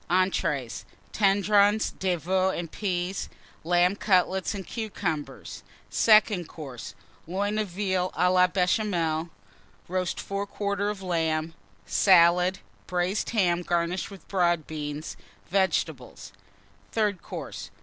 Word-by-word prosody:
ENTREES. 165 -9 0 0.3
Tendrons 205 +1 +3
de 185 -2 +1
Veau 185 +3 +1
and 170 -3 -4
Peas. 185 -2 -2 0.3
Lamb 175 +3 +3
Cutlets 190 -1 +1
and 190 -2 -6
Cucumbers. 190 -9 -4 0.3
SECOND 215 -5 +4
COURSE. 135 -7 -8 0.3
Loin 205 +4 -1
of 215 - -1
Veal 185 -1 -1
à 180 0 +3
la 180 0 +5
Béchamel. 180 -3 0 0.6
Roast 185 0 -2
Fore 200 0 -3
quarter 200 0 -2
of 205 -2 -5
Lamb. 160 -2 -1 0.3
Salad. 180 0 +5 0.3
Braised 180 +3 -1
Ham, 180 -6 +2
garnished 175 +1 -1
with 195 -2 -13
Broad 175 -4 +1
Beans. 150 0 -5 0.3
Vegetables. 190 0 -1 0.6
THIRD 210 -5 0
COURSE. - - -7
185 Hz, 110 wpm, -27 LUFS, 170-200 Hz, 0.6 s, la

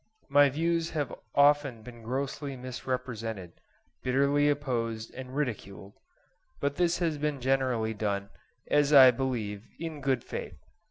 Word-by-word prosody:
My 145 0 +6
views 165 +3 0
have 145 -4 -1 0.2
often 140 -5 +4
been 120 0 -11
grossly 135 +3 -3
misrepresented, 120 -7 -5 0.4
bitterly 140 +3 +2
opposed 115 -6 -2
and 130 0 -8
ridiculed, 100 -8 -4 0.7
but 140 0 -1
this 175 -1 +2
has 165 -4 -1
been 150 -1 -1
generally 130 -4 +1
done, 100 -2 -2 0.4
as 145 0 +2
I 130 -3 +10
believe, 115 -5 -3
in 160 -3 -6
good 130 -3 0
faith. - - -6
130 Hz, 125 wpm, -29 LUFS, 115-145 Hz, 0.7 s, I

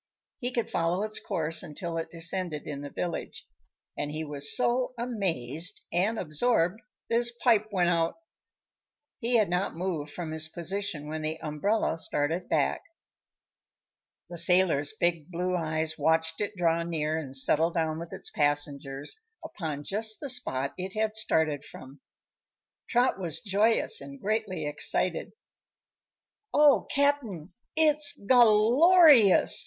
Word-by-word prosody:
He 250 -1 -1
could 235 -2 -1
follow 170 +4 0
its 215 0 -1
course 160 0 +1
until 165 +3 -6
it 165 - -5
descended 170 -1 -4
in 145 -2 -6
the 145 - -7
village 175 +3 -5 0.5
and 145 - -3
he 155 +1 -4
was 145 -1 0
so 250 +1 0
amazed 180 - -1
and 200 +6 +1
absorbed 180 +3 0 0.3
that 230 - +1
his 240 0 +1
pipe 220 -4 +4
went 180 -3 +2
out. 165 -1 +1 1.0
He 240 0 0
had 215 -3 +4
not 180 +1 -1
moved 165 -4 -3
from 165 -1 -6
his 160 0 -2
position 175 -1 -4
when 155 +1 -4
the 155 +1 -3
umbrella 165 +4 -1
started 160 +4 -2
back. - - +1 1.5
The 175 - -3
sailor's 170 -4 +3
big 170 -6 -1
blue 180 +1 -2
eyes 160 -1 -2
watched 160 +1 +1
it 205 0 -3
draw 170 -2 +1
near 160 -2 -2
and 135 -3 -5
settle 155 +5 +2
down 160 -2 -1
with 170 0 -8
its - - -8
passengers 145 - -2 0.2
upon 155 -6 -5
just 215 +6 -3
the 290 -3 -6
spot 140 - -2
it 185 +1 -5
had 215 0 -1
started 160 -9 0
from. 135 0 -13 0.9
Trot 245 -4 +2
was 170 -5 -4
joyous 225 - +1
and 280 -1 -10
greatly 205 - -2
excited. 145 - -1 1.2
"Oh, 295 -1 +5
Cap'n, 265 - 0 0.2
it's 305 -2 +5
gal 230 0 +5
lor 350 0 +7
ious!" 230 -10 +7
175 Hz, 140 wpm, -28 LUFS, 155-220 Hz, 1.5 s, lor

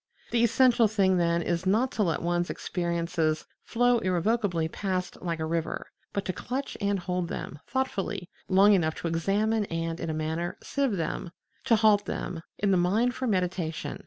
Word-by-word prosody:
The 235 0 +3
essential 235 0 +5
thing, 195 -3 +2
then, 170 -1 +2
is 175 +2 -1
not 225 +7 +2
to 215 - -2
let 165 -6 0
one's 175 0 0
experiences 170 -3 -1 0.2
flow 245 0 +2
irrevocably 185 -2 +1
past 185 +1 -3
like 170 -2 -2
a 160 - -1
river, 165 0 -3 0.2
but 200 - -2
to 185 - -1
clutch 265 +8 -4
and 200 0 +1
hold 180 -1 -2
them, 150 - -6
thoughtfully, 260 -9 -2 0.2
long 200 +2 +6
enough 160 -5 +2
to - - -4
examine 205 +6 +1
and, 165 -1 -3
in - - -3
a - - -1
manner, 160 +3 -2
sieve 275 -5 0
them, 170 +1 -3 0.4
to 240 -3 +5
halt 215 -2 +4
them 165 - -4 0.2
in 200 -1 +1
the 190 - +4
mind 210 +8 +2
for 255 +1 -3
meditation. 180 -5 -1
185 Hz, 175 wpm, -28 LUFS, 170-220 Hz, 0.4 s, long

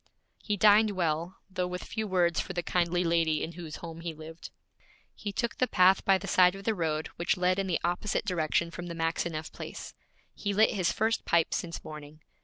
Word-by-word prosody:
He 210 -1 -1
dined 210 +2 +6
well, 170 -2 -1
though 185 -2 -2
with 180 0 -5
few 220 -1 -4
words 175 -3 +2
for 190 - -3
the 175 -1 -2
kindly 175 +1 +1
lady 165 -2 +1
in 165 - -4
whose 170 -2 -8
home 165 -1 -8
he 165 -1 -5
lived. 160 +2 -10 0.6
He 205 - -5
took 235 +3 -3
the 255 - +3
path 185 -2 +4
by 195 -1 +4
the - - -8
side 180 0 +5
of 195 - -9
the 225 - +1
road 160 -4 -2
which 170 +3 0
led 180 +1 +2
in 195 - -1
the 175 - 0
opposite 175 +4 -1
direction 170 -1 0
from 175 +1 -7
the 170 - -6
Maxineff 165 -1 -2
place. - - -8 0.4
He 200 -1 -3
lit 220 +2 +5
his 185 -5 +1
first 220 +1 0
pipe 170 -1 +2
since 170 -1 -4
morning. 150 0 -10
175 Hz, 210 wpm, -29 LUFS, 165-195 Hz, 0.6 s, dined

